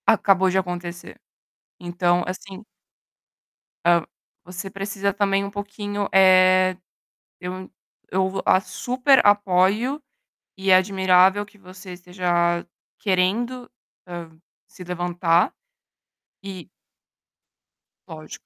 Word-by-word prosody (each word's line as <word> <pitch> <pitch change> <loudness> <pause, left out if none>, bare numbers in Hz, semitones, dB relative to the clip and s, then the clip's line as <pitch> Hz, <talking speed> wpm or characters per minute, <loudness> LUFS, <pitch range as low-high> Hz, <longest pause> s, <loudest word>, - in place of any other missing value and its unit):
Acabou 190 -3 +3
de 185 - 0
acontecer. 175 -2 -5 0.6
Então, 175 0 0
assim 190 +2 -8 1.2
Eh 170 0 +4 0.4
você 180 +2 -7
precisa 200 0 -3
também 200 -1 0
um 200 - -7
pouquinho, 205 0 -5
eh, 185 -1 +5 0.7
eu 185 +1 -7 0.4
eu 190 +1 +1
vou 190 0 -4
a 185 - +4
super 255 +6 +1
apoio 205 +7 +2 0.6
e 190 0 -3
é - - +8
admirável 190 +1 +3
que 210 0 -22
você 185 -1 -12
esteja 175 -1 -1 0.3
querendo, 225 +6 -1 0.4
hã, 175 -2 -8 0.4
se 185 - -12
levantar, 175 -1 0 0.9
e 190 -3 -9 1.4
Lógico. 155 -3 -11
185 Hz, 100 wpm, -22 LUFS, 180-200 Hz, 1.4 s, é